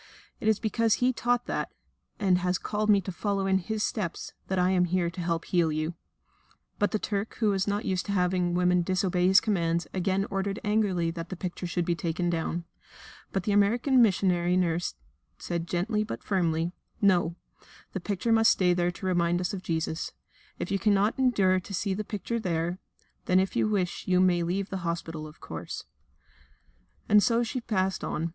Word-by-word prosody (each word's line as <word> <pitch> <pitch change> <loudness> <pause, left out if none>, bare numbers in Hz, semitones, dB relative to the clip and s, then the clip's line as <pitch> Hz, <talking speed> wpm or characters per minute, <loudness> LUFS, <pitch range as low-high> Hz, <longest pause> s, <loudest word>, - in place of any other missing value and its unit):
It 215 - -3
is 220 -2 +3
because 225 0 +2
He 250 +1 +2
taught 245 +1 0
that, - - -3 0.5
and 190 -4 +3
has 180 0 0
called 215 0 -2
me 200 -2 +6
to 190 - -5
follow 195 +1 -1
in 190 0 +3
His 215 +3 -3
steps, 190 -7 -3
that 190 - -1
I 180 +1 +3
am 180 -1 +3
here 175 -1 0
to 175 - -6
help 170 -1 -1
to - - -15
heal 170 -3 +3
you." 155 +2 -2 0.9
But 205 - +3
the - - 0
Turk, 205 0 -3
who 215 -3 +2
was 195 0 0
not 205 +1 -1
used 185 +1 -1
to - - -1
having 180 -2 +1
women 180 0 +3
disobey 180 0 +1
his 190 +1 +7
commands, 170 -5 0
again 190 +1 0
ordered 195 +1 -2
angrily 205 -6 +1
that 165 0 -6
the 185 - -4
picture 180 0 -5
should 175 0 -1
be 175 - +1
taken 175 +1 -1
down. 170 +1 -2 0.7
But 195 - -1
the 210 - 0
American 235 +6 +4
missionary 180 -4 +3
nurse 170 - 0 0.4
said 170 -1 -3
gently, 210 +6 0
but 215 - -6
firmly: 170 -3 0 0.3
"No, 175 -4 +3 0.6
the - - -2
picture 200 +4 -2
must 225 0 +5
stay 180 -2 +3
there 175 0 +1
to 175 +2 -7
remind 175 -1 +2
us 180 +1 -2
of 190 - -4
Jesus. 160 -2 -2 0.4
If - - -4
you 195 - +1
cannot 205 +3 +2
endure 200 -8 +3
to 190 +2 -10
see 195 +1 -1
the 210 +3 -3
picture 215 +3 -3
there, 175 -2 -1 0.5
then 185 +1 +4
if 190 0 -1
you - - +2
wish 185 -4 -1
you 180 -1 +3
may 180 -2 +4
leave 185 +3 -2
the 190 - -2
hospital, 165 -2 -4
of 155 - -14
course." - - -6 1.2
And 210 -1 +6
so 235 +2 +3
she 245 +2 -3
passed 190 -5 -1
on. 165 +2 -2
185 Hz, 195 wpm, -28 LUFS, 175-205 Hz, 1.2 s, his